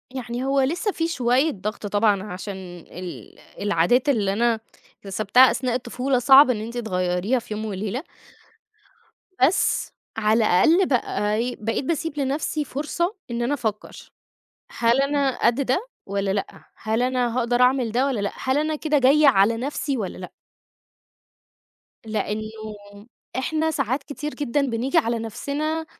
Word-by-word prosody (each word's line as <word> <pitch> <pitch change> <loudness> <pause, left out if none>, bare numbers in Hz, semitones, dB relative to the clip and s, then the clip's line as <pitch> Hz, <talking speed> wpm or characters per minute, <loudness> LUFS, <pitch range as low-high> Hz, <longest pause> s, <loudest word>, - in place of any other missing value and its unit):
يعني 245 0 -4
هو 275 0 +2
لسه 345 +10 0
في 330 -2 -1
شوية 260 0 +2
ضغط 210 +2 -5
طبعًا، 205 -1 +2
عشان 195 0 -6 0.4
ال 180 -1 -9 0.2
العادات 205 - +2
اللي 205 -7 +1
أنا 230 +1 +1 0.4
اكتسبتها 215 +6 +4
أثناء 250 -1 -1
الطفولة 250 +1 -1
صعب 270 +2 +7
إن 215 -4 0
أنتِ 235 +2 -6
تغيّريها 185 +2 0
في 225 -2 -8
يوم 215 +1 -4
وليلة. 215 - -3 1.4
بس 325 +8 +2 0.2
على 220 +1 +2
الأقل 325 - +4
بقى 210 -5 0
إيه 245 +3 -1
بقيت 225 +5 -2
باسيب 325 -1 -2
لنفسي 290 +2 -1
فرصة 335 - -2 0.2
إن 235 0 -2
أنا 250 +5 0
أفكر. 220 -6 -5 0.6
هل 235 +3 +2
أنا 275 -2 +1
قد 240 +4 +2
ده 360 - 0 0.2
والّا 200 0 -1
لأ؟ 195 0 -4
هل 220 +2 -1
أنا 250 -2 0
هاقدر 245 0 +1
أعمل 250 -3 +3
ده 255 +3 +2
والّا 250 -7 -1
لأ؟ 200 - -2
هل 260 +2 0
أنا 310 0 0
كده 300 -1 +1
جاية 280 +3 +5
على 225 -1 +4
نفسي 275 +2 -2
والّا 195 -5 -4
لأ؟ 180 - -8 1.7
لإنه 215 0 -3 0.9
إحنا 315 +4 0
ساعات 265 0 -1
كتير 295 +1 -6
جدًا 290 -1 -1
بنيجي 260 +4 -1
على 235 -6 +2
نفسنا 285 +8 -3
245 Hz, 145 wpm, -23 LUFS, 215-280 Hz, 1.7 s, صعب